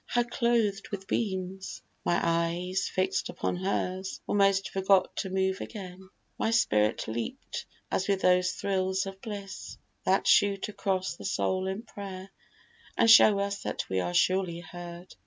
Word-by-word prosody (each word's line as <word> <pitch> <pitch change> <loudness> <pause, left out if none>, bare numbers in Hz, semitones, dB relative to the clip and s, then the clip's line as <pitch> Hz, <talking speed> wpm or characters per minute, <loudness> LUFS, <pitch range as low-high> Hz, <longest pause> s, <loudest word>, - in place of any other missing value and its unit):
How 240 - +2
clothed 235 -4 0
with 195 -1 -5
beams! 190 -2 -3 0.2
My 175 - +2
eyes, 170 +3 0
fix'd 190 0 0
upon - - -2
hers, 190 0 -2
Almost 195 -1 +2
forgot 190 -1 +3
even 190 - -6
to - - -3
move 190 0 0
again. 190 -3 -8 0.3
My - - +1
spirit 110 - +2
leap'd 115 +1 -4 0.3
as 190 - 0
with 195 -1 +1
those 180 0 +4
thrills 190 -1 0
of 195 0 -8
bliss 200 -3 -7 0.3
That 190 +1 +3
shoot 200 -1 +4
across 190 -2 -1
the - - -9
soul 190 -1 0
in 190 +4 -3
prayer, 195 -3 -8 0.7
and 230 - +6
show 215 -2 +8
us 200 0 -2
That - - -3
we 95 - 0
are 90 -1 -2
surely 185 -2 +2
heard. 175 +1 -9
190 Hz, 155 wpm, -29 LUFS, 180-200 Hz, 0.7 s, show